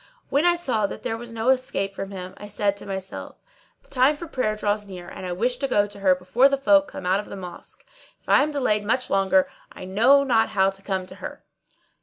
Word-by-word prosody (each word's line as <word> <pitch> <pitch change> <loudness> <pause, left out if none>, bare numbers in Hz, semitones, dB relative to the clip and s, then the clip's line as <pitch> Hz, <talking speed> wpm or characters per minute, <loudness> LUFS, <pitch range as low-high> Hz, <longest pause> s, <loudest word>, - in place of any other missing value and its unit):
When 285 +4 +2
I 350 0 +5
saw 245 -12 0
that - - -9
there 225 - -2
was 235 +1 -9
no 230 +2 -1
escape 250 -7 0
from 195 0 -5
him 185 -2 -7
I 205 - -9
said 205 -1 0
to 205 - -11
myself, 190 -1 -6 0.5
"The - - -26
time 265 +3 +4
for 340 - -7
prayer 255 -9 -1
draws 210 0 -1
near 185 -3 -10
and 185 - -7
I - - -3
wish 240 +8 0
to 275 +1 -1
go 205 -5 +3
to 205 0 -11
her 190 -2 +4
before 205 +9 +3
the 275 - +1
folk 290 +2 +4
come 185 - -8
out 185 +2 +2
of 210 - -6
the - - -7
mosque. 180 -2 -10 0.3
If - - -34
I - - +5
am 295 - +1
delayed 255 -8 0
much 245 +5 -1
longer, 190 -1 +3 0.2
I - - -9
know 240 +9 +5
not 230 -5 +2
how 195 -1 +2
to 195 0 -12
come 190 -1 -2
at 185 - -14
her." - - -8
210 Hz, 245 wpm, -24 LUFS, 195-255 Hz, 0.5 s, I